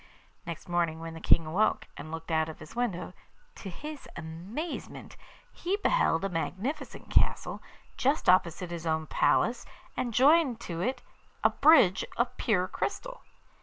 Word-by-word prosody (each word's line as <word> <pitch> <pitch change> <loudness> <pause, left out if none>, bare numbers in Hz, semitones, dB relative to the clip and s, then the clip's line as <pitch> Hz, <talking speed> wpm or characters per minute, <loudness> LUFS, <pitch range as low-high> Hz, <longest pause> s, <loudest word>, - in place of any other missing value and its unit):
Next 170 -2 -6
morning 170 -2 0
when 165 0 -6
the 165 - -8
King 165 - +4
awoke, 185 +8 +1
and 155 - -8
looked 165 +1 -6
out 160 0 +2
of 160 - -8
his 155 +8 -12
window, 200 -7 -2 0.4
to 195 - -8
his 300 - -8
amazement 175 - -6 0.4
he 375 +3 -2
beheld 410 - +2
a - - -1
magnificent 195 - -4
castle, - - +2 0.4
just 275 +4 +1
opposite 180 -1 +3
his 170 -1 -5
own 160 0 0
palace, 150 - +2 0.3
and 245 - -2
joined 270 0 +4
to 170 -6 -5
it 255 +8 -2 0.4
a - - +5
bridge 280 - +5
of 235 +1 0
pure 185 -5 +1
crystal. - - -4
185 Hz, 150 wpm, -29 LUFS, 165-255 Hz, 0.4 s, a